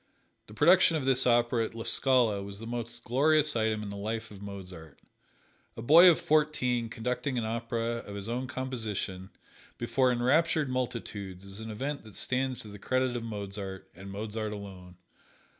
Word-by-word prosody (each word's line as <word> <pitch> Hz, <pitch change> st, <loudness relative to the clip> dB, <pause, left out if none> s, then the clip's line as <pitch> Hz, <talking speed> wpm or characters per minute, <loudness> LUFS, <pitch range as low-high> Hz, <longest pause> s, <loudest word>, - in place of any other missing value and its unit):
The 105 Hz, -, -13 dB
production 165 Hz, +3 st, +5 dB
of 140 Hz, -, -3 dB
this 130 Hz, -1 st, +3 dB
opera 120 Hz, -1 st, +3 dB
at 115 Hz, -, -5 dB
La 115 Hz, -, -5 dB
Scala 120 Hz, -3 st, +2 dB
was 100 Hz, 0 st, -7 dB
the 115 Hz, -, -9 dB
most 120 Hz, 0 st, -5 dB
glorious 150 Hz, +4 st, +3 dB
item 110 Hz, -1 st, 0 dB
in 105 Hz, -, -5 dB
the 100 Hz, -, -6 dB
life 110 Hz, +2 st, -4 dB
of 100 Hz, -1 st, -11 dB
Mozart. 90 Hz, -6 st, -9 dB, 0.8 s
A -, -, -5 dB
boy 165 Hz, +8 st, +9 dB
of 170 Hz, -, +3 dB
fourteen 130 Hz, -6 st, +1 dB
conducting 125 Hz, +4 st, -2 dB
an 115 Hz, -, -1 dB
opera 115 Hz, +1 st, -2 dB
of 100 Hz, -, -9 dB
his 100 Hz, 0 st, -6 dB
own 125 Hz, +3 st, -2 dB
composition 110 Hz, -8 st, -4 dB, 0.5 s
before 130 Hz, -1 st, +2 dB
enraptured 145 Hz, +4 st, +2 dB
multitudes 105 Hz, -7 st, -4 dB
is 100 Hz, +1 st, -10 dB
an 110 Hz, 0 st, -7 dB
event 140 Hz, +7 st, -4 dB
that 110 Hz, -2 st, -14 dB
stands 130 Hz, -1 st, -1 dB
to -, -, -11 dB
the 105 Hz, 0 st, -10 dB
credit 130 Hz, +2 st, 0 dB
of 120 Hz, -, -3 dB
Mozart, 100 Hz, -3 st, -6 dB
and 95 Hz, +3 st, -10 dB
Mozart 105 Hz, +1 st, -4 dB
alone. 95 Hz, -3 st, -9 dB
115 Hz, 175 wpm, -29 LUFS, 100-130 Hz, 0.8 s, boy